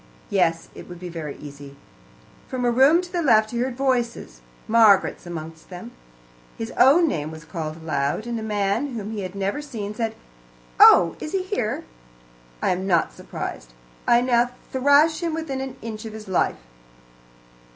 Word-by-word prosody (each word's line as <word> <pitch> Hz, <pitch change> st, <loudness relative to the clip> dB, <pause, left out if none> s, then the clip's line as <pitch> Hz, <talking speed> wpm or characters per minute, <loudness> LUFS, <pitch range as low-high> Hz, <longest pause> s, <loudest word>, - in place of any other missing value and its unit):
Yes, 175 Hz, -4 st, +1 dB
it -, -, -11 dB
would 175 Hz, -1 st, -9 dB
be 180 Hz, 0 st, -7 dB
very 160 Hz, -4 st, -6 dB
easy. 140 Hz, -1 st, -11 dB, 0.7 s
From 255 Hz, -1 st, -3 dB
a 240 Hz, -, +3 dB
room 275 Hz, +8 st, +5 dB
to 355 Hz, -, -10 dB
the 350 Hz, -, -1 dB
left 220 Hz, -7 st, +4 dB
he 235 Hz, -, -3 dB
heard 250 Hz, 0 st, -2 dB
voices, 240 Hz, -, -1 dB, 0.3 s
Margaret's 215 Hz, -5 st, +4 dB
amongst 160 Hz, -1 st, -8 dB
them. 175 Hz, -9 st, -9 dB, 0.7 s
His 225 Hz, +1 st, -5 dB
own 305 Hz, +7 st, +5 dB
name 155 Hz, -, -2 dB
was 160 Hz, 0 st, -10 dB
called 155 Hz, -2 st, -5 dB
aloud, 160 Hz, +3 st, -2 dB
and 235 Hz, -1 st, -3 dB
a -, -, -6 dB
man 215 Hz, +5 st, -1 dB
whom 215 Hz, -1 st, -5 dB
he 215 Hz, -2 st, -4 dB
had 185 Hz, 0 st, -6 dB
never 200 Hz, +8 st, -2 dB
seen 220 Hz, -8 st, -6 dB
said, 225 Hz, 0 st, -3 dB, 0.6 s
"Oh, 170 Hz, -2 st, +7 dB
is 305 Hz, -, -6 dB
he 375 Hz, -1 st, -1 dB
there? 215 Hz, -3 st, -2 dB, 0.8 s
I -, -, +2 dB
am 185 Hz, +1 st, -2 dB
not 170 Hz, -4 st, +2 dB
surprised. -, -, -7 dB, 0.3 s
I 240 Hz, 0 st, +5 dB
now 245 Hz, -1 st, +2 dB, 0.2 s
thrash 285 Hz, +4 st, +4 dB
him 335 Hz, -2 st, -1 dB
within 295 Hz, -5 st, -4 dB
an 265 Hz, -1 st, -6 dB
inch 220 Hz, -1 st, -6 dB
of 220 Hz, -, -7 dB
his 220 Hz, -1 st, -9 dB
life." 185 Hz, -, +1 dB
220 Hz, 170 wpm, -23 LUFS, 175-260 Hz, 0.8 s, Oh